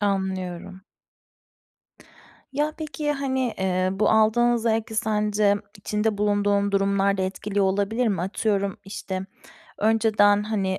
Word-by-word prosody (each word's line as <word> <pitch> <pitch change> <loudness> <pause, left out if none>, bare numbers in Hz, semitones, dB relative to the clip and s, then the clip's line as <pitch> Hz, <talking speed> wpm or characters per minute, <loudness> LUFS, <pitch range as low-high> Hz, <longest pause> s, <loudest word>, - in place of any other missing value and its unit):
Anlıyorum. 190 -2 -3 1.7
Ya, 295 +2 0
peki, 300 -1 -2
hani, 265 -4 -1
eee, 185 -1 0
bu 195 +2 +1
aldığın 235 +2 +4
zevki 225 0 -1
sence 210 -2 +1 0.2
içinde 210 +1 -1
bulunduğun 205 -1 +1
durumlar 200 0 +2
da - - +1
etkiliyor 195 +1 -1
olabilir 205 +5 +1
mi? 190 -5 -1
Atıyorum, 200 +1 -1
işte, 190 -1 -5 0.5
önceden, 210 -2 +3
hani, 200 -3 -1
205 Hz, 110 wpm, -24 LUFS, 195-220 Hz, 1.7 s, aldığın